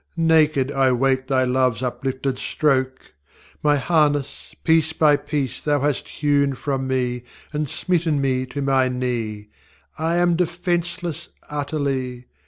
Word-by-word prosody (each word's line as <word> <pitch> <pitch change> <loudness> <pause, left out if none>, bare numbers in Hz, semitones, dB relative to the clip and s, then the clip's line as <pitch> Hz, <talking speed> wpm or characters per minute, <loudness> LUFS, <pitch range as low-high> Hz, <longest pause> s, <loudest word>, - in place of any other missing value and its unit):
ŌĆÖ - - -40
Naked 155 -4 +3
I 135 -2 +3
wait 130 +1 +1
Thy 130 -1 +2
loveŌĆÖs 125 -2 +1
uplifted 130 +1 -2
stroke! 130 - -1 0.5
My 150 -1 +3
harness 145 -1 0
piece 160 -1 +3
by 150 -2 +4
piece 140 -3 -3
Thou 145 -2 +1
hast 145 -1 -1
hewn 140 -2 +1
from 135 0 -2
me, 125 -2 -1 0.3
And 150 -1 -2
smitten 165 -3 0
me 130 -1 0
to 140 +2 -4
my 135 -1 +3
knee; 115 -5 -3 0.5
I 165 +2 0
am 175 0 +3
defenceless 175 -1 -2 0.2
utterly. 140 -4 -2
140 Hz, 135 wpm, -22 LUFS, 130-155 Hz, 0.5 s, by